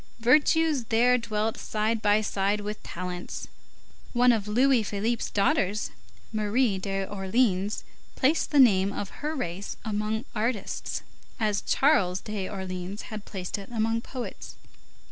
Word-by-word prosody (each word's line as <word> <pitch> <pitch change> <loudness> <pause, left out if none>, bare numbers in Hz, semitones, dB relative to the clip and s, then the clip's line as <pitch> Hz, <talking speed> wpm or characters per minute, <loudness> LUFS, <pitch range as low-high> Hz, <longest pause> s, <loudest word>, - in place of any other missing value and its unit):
Virtues 295 +2 +4
there 240 +3 +4
dwelt 220 -1 -2
side 215 +1 -1
by 210 0 +4
side 205 0 0
with 210 +1 -5
talents. 180 0 -6 0.7
One 245 0 +5
of 215 -3 0
Louis 250 +3 +4
Philippe's 215 +3 -1
daughters, 210 - +1 0.4
Marie 215 0 +1
d'Orleans, 195 +1 0 0.3
placed 290 +5 +2
the 295 - +1
name 200 -6 +6
of 200 0 -6
her 305 +2 -2
race 195 - -4
among 215 +1 -1
artists, 225 -1 -2 0.4
as 210 -2 +1
Charles 200 -11 +3
d'Orleans 190 -1 -5
had 215 -1 -6
placed 190 0 -4
it 195 - -10
among 225 0 0
poets. 250 0 -7
215 Hz, 125 wpm, -27 LUFS, 195-240 Hz, 0.7 s, name